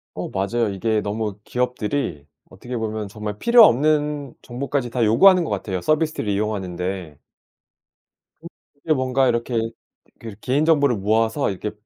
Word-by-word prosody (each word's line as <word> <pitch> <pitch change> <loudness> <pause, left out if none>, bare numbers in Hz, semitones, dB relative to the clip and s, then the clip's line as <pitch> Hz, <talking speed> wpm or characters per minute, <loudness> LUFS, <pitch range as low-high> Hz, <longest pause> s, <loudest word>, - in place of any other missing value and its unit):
어 - - -5
맞아요. 100 +4 -1
이게 105 +2 -1
너무 105 0 -3
기업들이 125 - -2 0.2
어떻게 125 +1 -8
보면 110 -2 -3
정말 105 0 -6
필요 235 - +7
없는 150 -1 +1
정보까지 130 0 -3
다 120 -1 -1
요구하는 180 - +6
것 - - -4
같아요, 95 -3 -3
서비스를 155 -7 0
이용하는 100 -3 -2
데. 90 -4 -5 1.5
이렇게 150 +2 -1
뭔가 130 0 +1
이렇게 120 0 0 0.6
그런 110 -3 -9
개인정보를 145 -1 +2
모아서 110 +6 +1
이렇게 100 +2 -4
115 Hz, 335 characters per minute, -22 LUFS, 105-140 Hz, 1.5 s, 필요